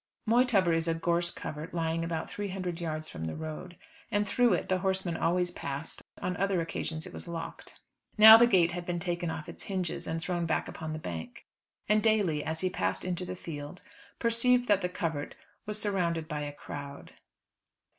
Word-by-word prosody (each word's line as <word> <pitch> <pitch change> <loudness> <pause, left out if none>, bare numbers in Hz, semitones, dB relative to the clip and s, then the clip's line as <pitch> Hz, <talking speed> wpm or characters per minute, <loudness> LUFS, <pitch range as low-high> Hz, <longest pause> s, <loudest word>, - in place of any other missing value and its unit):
Moytubber 225 -7 +4
is 165 0 0
a 165 - +1
gorse 170 +1 +2
covert 160 +1 -6
lying 165 0 0
about 165 -1 -3
three 205 0 -4
hundred 180 -3 -4
yards 155 -2 -3
from 80 - -6
the 80 - -4
road, 160 +3 -7 0.3
and 205 0 +1
through 245 +3 +4
it - - -1
the 185 0 +1
horsemen 190 -2 0
always 175 +2 +1
passed; 140 -1 -6 0.2
on 180 - -1
other 195 -1 +1
occasions 160 -1 -3
it - - -10
was - - -8
locked. 165 -1 -7 0.4
Now 220 +1 +12
the 235 +1 +7
gate 175 -6 +4
had 175 0 -4
been 175 0 -2
taken 175 -1 -2
off 160 -1 -5
its - - -7
hinges 185 -4 -3
and 165 - -2
thrown 175 0 -2
back - - 0
upon 160 -1 -6
the - - -3
bank; 85 - -7 0.4
and 210 +1 +4
Daly, 205 -9 +2
as 160 0 -2
he 185 - +1
passed - - -1
into 180 0 -2
the 185 - -4
field, 155 -1 -8 0.3
perceived 245 +1 +3
that 205 -2 +4
the 180 - -1
covert 160 -5 -3 0.3
was 210 0 0
surrounded 175 -6 +1
by 150 -1 -3
a 145 0 -4
crowd. 145 -1 -9
175 Hz, 195 wpm, -30 LUFS, 160-195 Hz, 0.4 s, Now